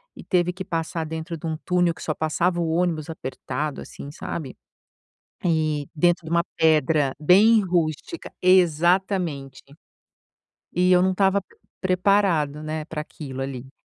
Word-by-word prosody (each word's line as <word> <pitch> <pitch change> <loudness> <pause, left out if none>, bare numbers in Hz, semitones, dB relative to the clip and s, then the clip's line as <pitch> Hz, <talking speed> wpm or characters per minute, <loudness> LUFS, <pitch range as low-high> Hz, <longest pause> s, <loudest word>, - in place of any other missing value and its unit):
e - - -11
teve 180 -2 +1
que 185 +1 -7
passar 165 0 -3
dentro 160 +2 -5
de 165 - -6
um 160 -1 -2
túnel 175 -2 +2
que - - -10
só 155 - -1
passava 170 +3 0
o 165 - -1
ônibus 165 -2 0
apertado, 150 -1 -4
assim, 140 - -9
sabe? 145 -2 -6 0.9
E 155 -4 0
dentro 175 +1 +2
de - - -7
uma 170 0 +3
pedra 155 -3 +3
bem 205 +8 +6
rústica, 175 - -2
exatamente, 175 -5 +2 1.1
e 180 +1 +3
eu 180 -1 +6
não 190 - +3
estava 195 +1 +2
p 195 - -26 0.3
preparado, 185 -6 +2
né, 155 0 -4
pra 155 -1 -5
aquilo, 135 -3 -8
ali. 135 -1 -6
165 Hz, 145 wpm, -24 LUFS, 150-180 Hz, 1.1 s, bem